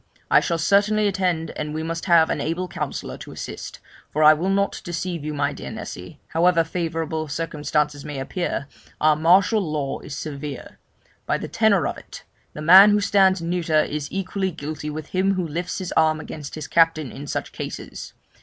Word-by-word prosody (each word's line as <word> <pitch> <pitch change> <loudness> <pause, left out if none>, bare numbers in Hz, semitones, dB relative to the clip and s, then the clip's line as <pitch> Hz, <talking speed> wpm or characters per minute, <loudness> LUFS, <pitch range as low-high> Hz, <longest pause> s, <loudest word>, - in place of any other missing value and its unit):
I - - +7
shall 170 - -1
certainly 205 +5 +3
attend, 180 -4 -1
and 150 0 -5
we 160 - -2
must 165 +1 -4
have 170 -3 +5
an - - -1
able 170 +4 -2
counsellor - - -5
to - - -9
assist, - - -7 0.3
for 155 - 0
I 155 0 +9
will 170 +5 -1
not 200 0 0
deceive 175 -1 -4
you, 155 - -3
my 145 -1 -1
dear 65 - -7
Nessy, - - -8
however 165 0 +3
favourable 160 -1 -3
circumstances 150 -1 -2
may 150 -2 -6
appear, 140 +1 -3 0.3
our 155 0 +4
martial 185 +7 +4
law 150 -6 -3
is 140 - -8
severe; 145 -3 -7 0.5
by - - +1
the - - -6
tenor - - +2
of - - -3
it, - - -12 0.3
the 150 - -7
man 190 +6 +9
who 210 0 +4
stands 195 -3 +3
neuter 165 -2 +1
is 150 -1 -4
equally 195 0 -2
guilty 155 -2 -6
with 155 0 -6
him 195 +1 +1
who 180 -2 -1
lifts 175 +4 -4
his 185 -2 -5
arm 155 0 +3
against 150 -2 -8
his 155 -1 -5
captain 165 -4 +2
in 145 +1 -8
such - - -3
cases. - - -7
165 Hz, 185 wpm, -23 LUFS, 150-185 Hz, 0.5 s, I